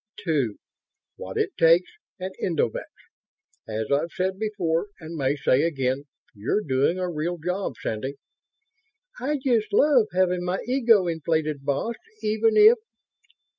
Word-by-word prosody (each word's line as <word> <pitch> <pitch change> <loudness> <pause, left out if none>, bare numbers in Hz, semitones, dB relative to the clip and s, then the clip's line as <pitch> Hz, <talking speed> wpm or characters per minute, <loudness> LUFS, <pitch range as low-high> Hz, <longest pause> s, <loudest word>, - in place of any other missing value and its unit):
"Two. 140 - +1 0.6
What - - -7
it - - 0
takes 165 +2 +5 0.3
and 185 +1 -5
endovix. 160 - -1 0.8
As 110 +2 -3
I've 145 +4 +1
said 190 +1 -2
before 200 -5 -1
and 165 0 -8
may 140 -2 0
say 135 -1 +2
again, 135 -4 -1 0.3
you're 110 - -1
doing 135 +5 +1
a 185 -1 -1
real 170 +1 -2
job, 180 -2 -3
Sandy." 130 +6 -3 1.0
"I 285 +4 -1
just 240 -5 0
love 255 -1 +4
having 180 0 +1
my 180 +1 -1
ego 230 -6 +4
inflated, 160 -3 -1
boss, 180 +12 -1 0.3
even 220 +1 +2
if 435 +3 +8
175 Hz, 130 wpm, -25 LUFS, 145-210 Hz, 1.0 s, if